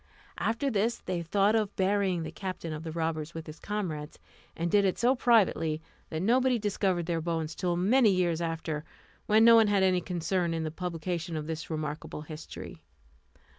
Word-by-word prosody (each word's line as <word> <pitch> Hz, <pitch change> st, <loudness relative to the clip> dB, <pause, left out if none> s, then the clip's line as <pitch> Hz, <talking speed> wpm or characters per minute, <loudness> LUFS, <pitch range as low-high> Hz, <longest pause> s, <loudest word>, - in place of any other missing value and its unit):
After 265 Hz, +5 st, 0 dB
this 225 Hz, +2 st, +1 dB
they 180 Hz, -2 st, -3 dB
thought 200 Hz, +5 st, +2 dB
of 215 Hz, -3 st, 0 dB
burying 190 Hz, -3 st, +1 dB
the -, -, -5 dB
captain 185 Hz, -4 st, -5 dB
of 155 Hz, -, -5 dB
the 165 Hz, -, -5 dB
robbers 160 Hz, -1 st, -3 dB
with 165 Hz, -1 st, -6 dB
his 155 Hz, 0 st, -10 dB
comrades, 170 Hz, -8 st, -4 dB, 0.4 s
and 170 Hz, 0 st, -1 dB
did 205 Hz, -1 st, +5 dB
it 190 Hz, -2 st, +1 dB
so 245 Hz, +2 st, +4 dB
privately 195 Hz, -10 st, +3 dB, 0.3 s
that 160 Hz, +2 st, -3 dB
nobody 250 Hz, +3 st, +3 dB
discovered 195 Hz, -4 st, 0 dB
their 165 Hz, -1 st, -1 dB
bones 165 Hz, -1 st, -2 dB
till 175 Hz, -1 st, -1 dB
many 220 Hz, +6 st, +4 dB
years 175 Hz, -3 st, +1 dB
after, 160 Hz, -2 st, -3 dB, 0.4 s
when 220 Hz, +1 st, +5 dB
no 230 Hz, 0 st, +9 dB
one 225 Hz, -2 st, +6 dB
had 200 Hz, -2 st, +3 dB
any 185 Hz, -1 st, +3 dB
concern 175 Hz, 0 st, -1 dB
in 165 Hz, -, -2 dB
the 155 Hz, -, -3 dB
publication 170 Hz, 0 st, -3 dB
of 150 Hz, -, -4 dB
this 160 Hz, 0 st, -5 dB
remarkable 155 Hz, -1 st, -4 dB
history. 155 Hz, 0 st, -9 dB
175 Hz, 180 wpm, -29 LUFS, 160-205 Hz, 0.4 s, no